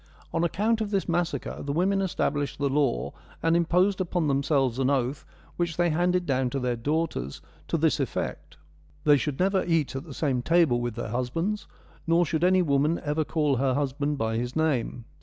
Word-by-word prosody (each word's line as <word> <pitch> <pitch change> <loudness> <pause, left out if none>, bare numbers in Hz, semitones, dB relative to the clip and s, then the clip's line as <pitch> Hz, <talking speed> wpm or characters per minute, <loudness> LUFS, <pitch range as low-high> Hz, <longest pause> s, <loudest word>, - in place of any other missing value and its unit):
On 165 - +1
account 215 +6 +1
of 215 - -1
this 195 -2 -1
massacre, 175 0 -2
the 140 - -3
women 190 +6 +1
established 145 -6 -1
the 140 0 0
law 135 - 0 0.3
and 165 0 +3
imposed 180 +3 +2
upon 175 -3 0
themselves 135 -3 +1
an 135 0 +2
oath, 135 0 -1 0.3
which 170 -2 -1
they 175 -1 +2
handed 180 +2 +1
down 130 -3 +1
to 135 - -2
their 125 -1 -1
daughters, 140 - -2 0.3
to - - 0
this - - +2
effect: - - -4 0.5
They 145 -1 +6
should 140 -1 -2
never 190 0 +2
eat 165 -6 0
at 135 - -5
the 150 - -9
same 135 -5 0
table 160 -5 +3
with 120 -2 -3
their - - -4
husbands, 165 +12 -2 0.4
nor 170 +1 +4
should 160 +2 -1
any 185 0 +4
woman 150 +2 +2
ever 150 +1 0
call 150 -3 0
her 130 0 +1
husband 145 +1 -1
by 110 -2 -1
his 120 +1 -3
name. 135 -7 0
150 Hz, 190 wpm, -27 LUFS, 135-175 Hz, 0.5 s, They